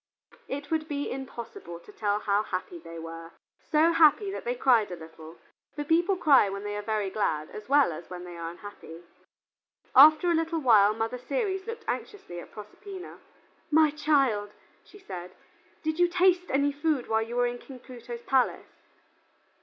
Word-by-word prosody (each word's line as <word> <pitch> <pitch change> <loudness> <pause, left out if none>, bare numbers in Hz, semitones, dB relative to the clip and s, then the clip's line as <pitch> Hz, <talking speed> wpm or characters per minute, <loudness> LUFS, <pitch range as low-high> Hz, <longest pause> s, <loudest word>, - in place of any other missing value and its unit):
It 285 +2 -6
would 315 -1 0
be 285 -2 -3
impossible 235 -9 -8
to - - -15
tell 205 -1 -1
how 205 0 +1
happy 185 -4 -5
they 165 0 -10
were; 165 0 -9 0.4
so 315 +2 +4
happy 335 +5 +4
that - - -7
they 245 +1 -1
cried 240 -4 +3
a 180 - -5
little, 160 0 -12 0.4
for 295 - -3
people 340 +6 +2
cry 285 - +5
when 200 +1 -5
they 205 0 -4
are 205 - -3
very 210 -2 -2
glad 155 -8 -1
as 210 +3 -10
well 285 -7 +4
as 165 +2 -10
when 180 -1 -7
they 175 -1 -9
are 165 -1 -5
unhappy. 175 -2 -11 0.9
After 310 +6 +8
a - - +3
little 330 0 0
while 215 -8 +5
Mother 225 +3 -3
Ceres 385 - -2
looked 460 -1 -7
anxiously 280 - -5
at - - -12
Proserpina. 370 - -10 0.5
"My 310 -1 +4
child," 275 -9 +1 0.3
she - - -16
said, 180 - -9 0.5
"did 315 +1 -2
you 350 - +5
taste 360 0 +2
any 280 +1 +2
food 290 -2 -1
while 220 0 +1
you 230 +2 -5
were 245 0 +2
in 245 0 -3
King 265 +1 -11
Pluto's 240 -1 -9
palace?" 265 -2 0
245 Hz, 175 wpm, -27 LUFS, 200-310 Hz, 0.9 s, After